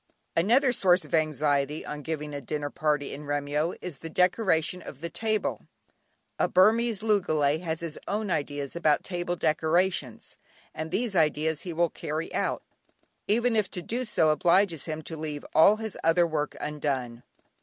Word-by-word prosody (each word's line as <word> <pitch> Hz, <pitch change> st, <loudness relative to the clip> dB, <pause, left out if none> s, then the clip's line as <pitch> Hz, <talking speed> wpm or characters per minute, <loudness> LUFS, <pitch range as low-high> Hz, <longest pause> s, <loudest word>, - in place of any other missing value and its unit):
Another 240 Hz, -, +4 dB
source 185 Hz, -5 st, +3 dB
of -, -, -14 dB
anxiety 150 Hz, -1 st, +1 dB
on 150 Hz, 0 st, -6 dB
giving 150 Hz, -1 st, -4 dB
a 145 Hz, -, -4 dB
dinner 145 Hz, +2 st, -3 dB
party 150 Hz, -2 st, -1 dB
in 150 Hz, +2 st, -8 dB
Remyo 145 Hz, +3 st, -1 dB
is 175 Hz, -6 st, -7 dB
the 165 Hz, -, -7 dB
decoration 180 Hz, -1 st, +1 dB
of 140 Hz, -, -10 dB
the 170 Hz, +2 st, -5 dB
table. 220 Hz, -1 st, -2 dB, 0.7 s
A -, -, +3 dB
Burmese 220 Hz, +2 st, +3 dB
loogalay 155 Hz, -9 st, +2 dB
has 165 Hz, -2 st, -3 dB
his 165 Hz, -2 st, -5 dB
own 210 Hz, -1 st, -2 dB
ideas 145 Hz, -1 st, -3 dB
about 155 Hz, -3 st, +2 dB
table 175 Hz, -1 st, -3 dB
decorations, 160 Hz, -4 st, 0 dB, 0.3 s
and 155 Hz, +1 st, -5 dB
these 220 Hz, +2 st, -1 dB
ideas 155 Hz, -1 st, +1 dB
he 180 Hz, -, -6 dB
will 170 Hz, 0 st, +1 dB
carry 155 Hz, +2 st, -4 dB
out, -, -, -1 dB, 0.6 s
even 230 Hz, +3 st, +2 dB
if 210 Hz, -4 st, +1 dB
to 180 Hz, -, -6 dB
do 240 Hz, +7 st, -2 dB
so 185 Hz, -9 st, +2 dB
obliges 170 Hz, 0 st, +2 dB
him 155 Hz, -1 st, -4 dB
to 160 Hz, -, -6 dB
leave 150 Hz, -2 st, -5 dB
all 200 Hz, +6 st, +7 dB
his 220 Hz, -2 st, -6 dB
other 165 Hz, +2 st, +4 dB
work 155 Hz, -3 st, -2 dB
undone. 135 Hz, -6 st, -3 dB
160 Hz, 165 wpm, -27 LUFS, 150-185 Hz, 0.7 s, all